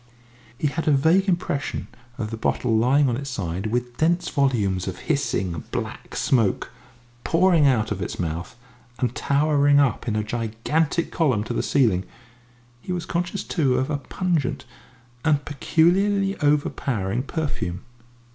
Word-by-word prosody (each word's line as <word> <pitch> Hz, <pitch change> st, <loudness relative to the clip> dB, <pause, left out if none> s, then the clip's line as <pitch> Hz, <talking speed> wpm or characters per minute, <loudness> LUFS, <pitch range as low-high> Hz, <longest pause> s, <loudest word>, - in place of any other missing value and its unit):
He -, -, -3 dB
had 160 Hz, +3 st, -1 dB
a -, -, +5 dB
vague 165 Hz, +8 st, +3 dB
impression 175 Hz, -6 st, -1 dB, 0.3 s
of 110 Hz, -4 st, -4 dB
the -, -, -3 dB
bottle 115 Hz, +1 st, 0 dB
lying 130 Hz, +6 st, +4 dB
on 120 Hz, -, +1 dB
its 140 Hz, +2 st, -5 dB
side, 95 Hz, -4 st, -3 dB
with 120 Hz, +2 st, -2 dB
dense 170 Hz, +3 st, +1 dB
volumes 105 Hz, -11 st, +1 dB
of 90 Hz, -, -4 dB
hissing, 95 Hz, -, -1 dB
black -, -, -5 dB
smoke 115 Hz, -7 st, +1 dB, 0.5 s
pouring 170 Hz, -3 st, +4 dB
out 115 Hz, -5 st, +2 dB
of 100 Hz, -2 st, -3 dB
its 85 Hz, -, -4 dB
mouth 85 Hz, +4 st, -4 dB, 0.4 s
and 125 Hz, -2 st, -1 dB
towering 145 Hz, 0 st, +3 dB
up 140 Hz, -3 st, +1 dB
in 110 Hz, -, 0 dB
a 105 Hz, -, 0 dB
gigantic 120 Hz, +9 st, -1 dB
column 130 Hz, -, +1 dB
to 115 Hz, -, -4 dB
the -, -, 0 dB
ceiling; 110 Hz, -10 st, +2 dB, 0.8 s
he 185 Hz, -, -6 dB
was 175 Hz, -2 st, -2 dB
conscious, 175 Hz, +3 st, -2 dB
too, 135 Hz, -7 st, +1 dB
of 130 Hz, +3 st, 0 dB
a 145 Hz, -, 0 dB
pungent 155 Hz, 0 st, -2 dB, 0.6 s
and 150 Hz, -2 st, +2 dB
peculiarly 195 Hz, +7 st, +2 dB
overpowering 130 Hz, -7 st, 0 dB
perfume. 135 Hz, -, -3 dB
140 Hz, 145 wpm, -24 LUFS, 110-160 Hz, 0.8 s, a